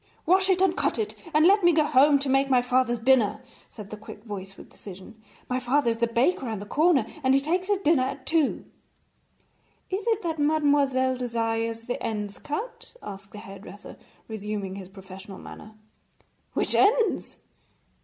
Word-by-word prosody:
'Wash 380 +2 +3
it, 370 -1 +3
and 375 -2 +3
cut - - 0
it, 435 -2 -2 0.2
and 310 +1 +4
let 400 +2 +5
me 345 - +6
go 315 -2 +3
home 290 0 +5
to 280 0 -2
make 270 +1 +2
my 255 -2 +5
father's 250 -1 +1
dinner,' 235 -2 +3 0.3
said 210 -3 -11
the - - -5
quick 210 0 -12
voice 195 -3 -8
with - - -12
decision. 195 +3 -12 0.3
'My 255 0 -1
father 255 0 +1
is 230 - -3
the 235 +1 +1
baker 250 +4 +1
round 220 -3 -4
the 205 - -7
corner, 300 +1 +2 0.2
and 265 -1 +3
he - - +5
takes 350 +6 -1
his 410 -1 +2
dinner 320 -7 +2
at 265 +1 -4
two.' 315 -2 0 1.3
'Is 390 +4 -3
it 445 -3 +1
that 325 -2 -3
mademoiselle 285 -4 +2
desires 230 -2 -2
the 245 - -4
ends 210 -2 -4
cut?' 440 +12 -6
asked 195 0 -9
the - - -10
hairdresser, 200 -1 -11 0.3
resuming 210 -3 -5
his 190 -1 -9
professional 190 0 -11
manner. 215 +1 -12 0.8
'Which - - +1
ends?' 445 +3 +2
255 Hz, 175 wpm, -26 LUFS, 215-310 Hz, 1.3 s, me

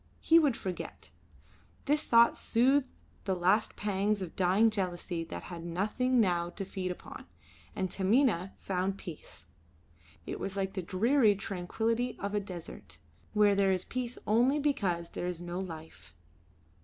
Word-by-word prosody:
He 330 +1 +6
would 285 -7 +2
forget. 185 -2 -6 0.7
This 295 +2 +2
thought 235 0 +6
soothed 260 +3 +2 0.4
the 190 -2 0
last 185 +5 +2
pangs 205 0 0
of 175 - -8
dying 195 +5 +4
jealousy 180 -4 -3
that - - -7
had 170 -2 -8
nothing 215 +9 0
now 175 -5 +2
to 195 +3 -6
feed 185 -1 -4
upon, 180 - -8 0.5
and 190 - -1
Taminah 195 0 +2
found 190 +1 -2
peace. 165 - -10 0.8
It - - -5
was 195 0 -4
like 195 -1 -1
the 190 - -3
dreary 215 +5 +3
tranquillity 225 +6 -2
of 200 +1 -3
a 210 - +2
desert, 165 - -9 0.4
where 210 -1 +5
there 195 -1 +3
is 185 -1 -1
peace 250 -1 -4
only 245 +7 +3
because 195 - 0
there 175 - -4
is 180 -2 -4
no 175 +1 -5
life. 160 - -9
195 Hz, 150 wpm, -31 LUFS, 180-230 Hz, 0.8 s, He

